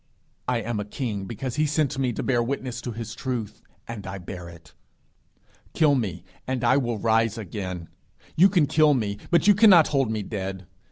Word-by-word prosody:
I 125 -2 +1
am 115 0 -3
a - - -2
king 105 -3 -4
because 120 +5 -5
he 155 0 +2
sent 145 -2 0
me 130 -2 +1
to - - -4
bear 120 -3 +2
witness 125 0 -3
to 120 - -5
his 115 0 -6
truth, 115 -4 -4 0.3
and 105 -5 -7
I 95 0 -5
bear 90 -1 -8
it. 85 -1 -15 1.0
Kill 155 -3 +4
me, 100 -10 -2 0.2
and 130 -1 -2
I 120 +2 +4
will 120 -5 0
rise 115 +1 +1
again. 90 -4 -5 0.5
You 185 +5 +6
can 175 -5 +3
kill 150 0 +4
me, 105 -4 -2
but 170 0 +3
you 205 - +8
cannot 195 -6 +7
hold 135 -5 +1
me 110 -2 -2
dead. 95 -2 -5
115 Hz, 190 wpm, -25 LUFS, 105-135 Hz, 1.0 s, you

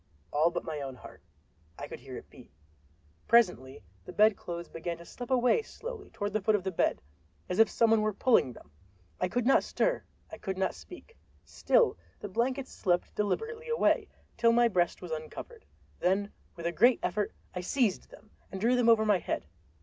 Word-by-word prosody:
All 155 +3 +4
but 175 0 -4
my 155 -2 -4
own 135 -2 -5
heart—I 80 -8 -14
could - - -8
hear - - -9
it - - -11
beat. - - -15 0.8
Presently 180 - +3 0.2
the - - -9
bedclothes 180 -5 +1
began 170 +1 -5
to 170 - -13
slip 245 +7 -8
away 250 - +3
slowly 455 -1 -8
toward 205 0 -4
the 215 - 0
foot 215 +2 +3
of 195 - -1
the 190 - -2
bed, 165 - 0 0.4
as 180 - -2
if 225 - +6
some 230 -1 +3
one 225 -1 +4
were 215 0 +1
pulling 215 - +3
them! 75 - -15 0.5
I - - +1
could 245 +6 -1
not 270 - +5
stir; - - 0 0.3
I 215 - -9
could 190 -1 -4
not 190 -1 0
speak. 415 +6 -13 0.3
Still - - +2 0.2
the 205 - -6
blankets 255 +6 -1
slipped 175 -2 0
deliberately 450 - -2
away, 465 - +2 0.3
till 230 -1 +4
my 240 0 +5
breast 180 -4 0
was 175 - -7
uncovered. 160 - -7 0.3
Then 195 +3 +1 0.2
with 170 - -8
a 170 - +1
great 240 +9 +4
effort 210 -1 -1 0.2
I 180 - -3
seized 215 0 0
them 215 - -17 0.2
and 190 - -5
drew 235 +5 +3
them 245 -2 +3
over 220 -1 +5
my 205 -3 +3
head. - - -3
210 Hz, 190 wpm, -30 LUFS, 175-245 Hz, 0.8 s, if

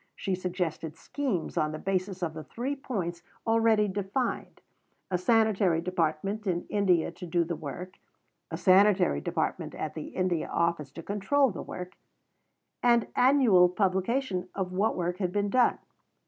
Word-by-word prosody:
She 195 - -2
suggested 175 -4 -3
schemes 255 - -3
on 155 0 +1
the - - -4
basis 185 +1 -2
of 160 -2 -2
the 155 -1 -7
Three 260 - -4
Points 185 -11 -4 0.2
already 225 -2 +3
defined 205 +6 -3 0.5
a 180 - +2
Sanitary 205 -5 +3
Department 180 +4 -1
in 175 -1 -1
India 185 -6 +2
to 175 +2 -9
do 170 +1 +2
the 170 +1 -3
work; 160 +5 -8 0.5
a - - -4
Sanitary 185 - +4
Department - - -2
at - - -4
the - - -6
India 180 -3 -1
Office 170 -4 0
to 165 - -8
control 225 - +1
the 185 - -6
work; 180 0 -8 0.8
and 235 -2 +3
annual 245 -9 +5
publication 190 +1 0
of 190 -2 -2
what 200 +4 0
work 175 +1 -2
had 180 -3 -1
been 205 +1 0
done. 255 -1 +3
185 Hz, 150 wpm, -28 LUFS, 175-215 Hz, 0.8 s, annual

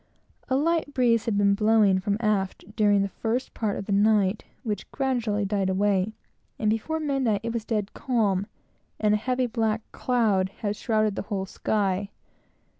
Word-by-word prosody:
A 260 - +2
light 310 0 0
breeze 235 -3 +3
had 220 -3 0
been 200 0 +4
blowing 210 -2 +4
directly - - -8
from 200 +1 0
aft 200 0 -2
during 205 -2 +3
the - - 0
first 230 +6 -3
part 210 -3 -2
of - - -5
the 205 - -4
night 205 0 +3 0.2
which 210 -5 -4
gradually 235 -6 0
died 195 -1 0
away, 200 +1 +1 0.4
and 215 -1 +1
before 315 +9 -1
midnight 270 -8 0
it 230 0 -3
was 230 -2 -3
dead 210 -3 -2
calm, 205 -6 0 0.5
and 210 -1 +3
a - - +4
heavy 255 +3 0
black 225 -2 -1
cloud 215 -7 +1
had 210 -2 -1
shrouded 215 -2 0
the - - -2
whole 195 -2 -1
sky. 195 0 -1
215 Hz, 175 wpm, -26 LUFS, 200-230 Hz, 0.5 s, been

